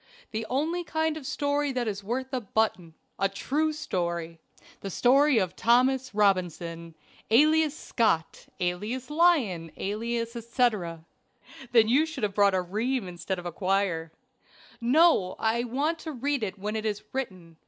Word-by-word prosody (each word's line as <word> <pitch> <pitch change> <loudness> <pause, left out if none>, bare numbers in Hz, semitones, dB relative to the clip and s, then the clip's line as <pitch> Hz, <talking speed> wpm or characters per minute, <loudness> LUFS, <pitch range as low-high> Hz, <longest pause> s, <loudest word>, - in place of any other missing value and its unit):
"The 220 0 -3
only 320 +7 0
kind 320 -1 -1
of 295 -4 -7
story 285 0 0
that 245 -2 -1
is 200 -1 -3
worth 260 +5 -3
a 255 - -1
button 195 -6 -1 0.2
a 195 0 +2
true 295 +10 -1
story 170 - -3 0.4
the 195 - -6
story 270 - +4
of 185 -4 0
Thomas 255 +2 +2
Robinson, 170 -5 0 0.3
alias 310 +5 +4
Scott, 190 -9 0
alias 210 +10 -3
Lyon, 265 - +2
alias 230 +3 -3
etc." 215 - -1 0.7
"Then 230 -3 +5
you 285 +8 +3
should 310 -7 -7
have 205 -1 0
brought 200 -1 +4
a 185 - +2
ream 220 +4 -2
instead 180 +2 -4
of 175 - -8
a 175 - -3
quire." 185 -3 0 0.7
"No! 250 - +4
I 230 +2 0
want 290 +7 -1
to 320 - -6
read 280 +1 -1
it 205 -2 -3
when 210 +2 -4
it 220 - -2
is 210 -1 -3
written. 185 -11 -5
225 Hz, 155 wpm, -27 LUFS, 185-270 Hz, 0.7 s, Then